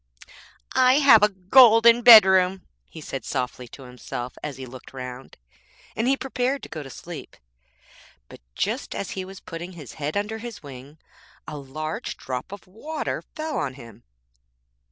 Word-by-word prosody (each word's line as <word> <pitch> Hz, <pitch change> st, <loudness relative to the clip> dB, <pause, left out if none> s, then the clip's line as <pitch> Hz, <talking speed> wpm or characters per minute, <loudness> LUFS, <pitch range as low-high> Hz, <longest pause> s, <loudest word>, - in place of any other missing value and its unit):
'I 255 Hz, 0 st, +4 dB
have 275 Hz, -7 st, +6 dB
a 210 Hz, -, +5 dB
golden 230 Hz, +4 st, +6 dB
bedroom,' 190 Hz, -5 st, +7 dB, 0.2 s
he 160 Hz, -, -11 dB
said 135 Hz, -4 st, -6 dB
softly 125 Hz, -2 st, -4 dB
to 135 Hz, -, -13 dB
himself 125 Hz, 0 st, -7 dB
as 145 Hz, -3 st, -6 dB
he 130 Hz, -, -7 dB
looked 130 Hz, +1 st, -13 dB
round, 125 Hz, 0 st, -9 dB, 0.6 s
and 230 Hz, -, -1 dB
he 270 Hz, +1 st, +2 dB
prepared 265 Hz, +1 st, -2 dB
to -, -, -9 dB
go 155 Hz, -, -6 dB
to 135 Hz, -, -10 dB
sleep; 165 Hz, +4 st, -10 dB, 0.9 s
but -, -, -14 dB
just -, -, -3 dB
as 200 Hz, -, -5 dB
he 190 Hz, -, -4 dB
was 190 Hz, +1 st, -11 dB
putting 170 Hz, +2 st, -8 dB
his 150 Hz, -8 st, -11 dB
head 150 Hz, +6 st, -2 dB
under 215 Hz, +2 st, -3 dB
his 235 Hz, -5 st, -9 dB
wing, 140 Hz, +2 st, -12 dB, 0.5 s
a 155 Hz, -, -7 dB
large 155 Hz, +3 st, -6 dB
drop 130 Hz, +6 st, -6 dB
of 200 Hz, -, -10 dB
water 225 Hz, +12 st, -5 dB
fell 310 Hz, 0 st, -3 dB
on 130 Hz, -4 st, -3 dB
him.' 115 Hz, -5 st, -14 dB
180 Hz, 160 wpm, -24 LUFS, -, 0.9 s, bedroom